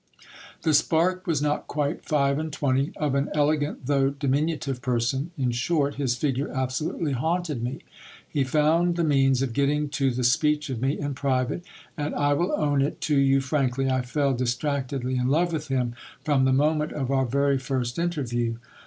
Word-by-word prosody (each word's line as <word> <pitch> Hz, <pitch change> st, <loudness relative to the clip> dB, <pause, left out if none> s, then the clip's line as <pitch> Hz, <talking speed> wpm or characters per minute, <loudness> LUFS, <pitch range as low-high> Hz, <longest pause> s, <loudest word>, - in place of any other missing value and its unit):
The 160 Hz, -, +2 dB
spark 175 Hz, +5 st, +2 dB
was 155 Hz, -4 st, +1 dB
not 150 Hz, 0 st, -1 dB
quite 145 Hz, +2 st, -2 dB
five 140 Hz, -2 st, +1 dB
and 160 Hz, 0 st, -4 dB
twenty; 140 Hz, -1 st, 0 dB
of 150 Hz, -3 st, -1 dB
an 140 Hz, +1 st, 0 dB
elegant, 145 Hz, -2 st, 0 dB
though 135 Hz, 0 st, +2 dB
di 140 Hz, 0 st, -4 dB
minutive 140 Hz, -2 st, 0 dB
person;.... 125 Hz, +4 st, 0 dB
in 130 Hz, -3 st, 0 dB
short, 140 Hz, +4 st, 0 dB
his 135 Hz, -4 st, -1 dB
figure 140 Hz, +1 st, -1 dB
absolutely 130 Hz, +4 st, -2 dB
haunted 160 Hz, 0 st, -1 dB
me. 125 Hz, +3 st, -4 dB, 0.5 s
He 140 Hz, -, 0 dB
found 160 Hz, +5 st, +2 dB
the 170 Hz, -, 0 dB
means 135 Hz, -3 st, +3 dB
of 125 Hz, -4 st, -2 dB
getting 145 Hz, +3 st, +1 dB
to 140 Hz, -1 st, +1 dB
the 125 Hz, 0 st, -2 dB
speech 150 Hz, +4 st, +2 dB
of 120 Hz, -3 st, -4 dB
me 135 Hz, +3 st, 0 dB
in 145 Hz, -1 st, -2 dB
private; 130 Hz, +3 st, -1 dB, 0.3 s
and, 150 Hz, -2 st, -3 dB
I 145 Hz, 0 st, +2 dB
will 175 Hz, +6 st, 0 dB
own 145 Hz, -2 st, +1 dB
it 140 Hz, -, -1 dB
to 150 Hz, -, +1 dB
you 135 Hz, 0 st, +4 dB
frankly, 135 Hz, -1 st, 0 dB
I 130 Hz, 0 st, +1 dB
fell 140 Hz, +2 st, 0 dB
distractedly 130 Hz, +1 st, -1 dB
in 125 Hz, 0 st, 0 dB
love 170 Hz, +5 st, +2 dB
with 155 Hz, -1 st, -3 dB
him 125 Hz, -3 st, -1 dB, 0.3 s
from 140 Hz, -4 st, +3 dB
the 130 Hz, -, +3 dB
moment 150 Hz, +3 st, +1 dB
of 135 Hz, -3 st, -2 dB
our 135 Hz, -1 st, +2 dB
very 140 Hz, +2 st, +2 dB
first 125 Hz, 0 st, -2 dB
in 175 Hz, +1 st, +1 dB
terview. 120 Hz, -7 st, -2 dB
140 Hz, 190 wpm, -25 LUFS, 130-150 Hz, 0.5 s, you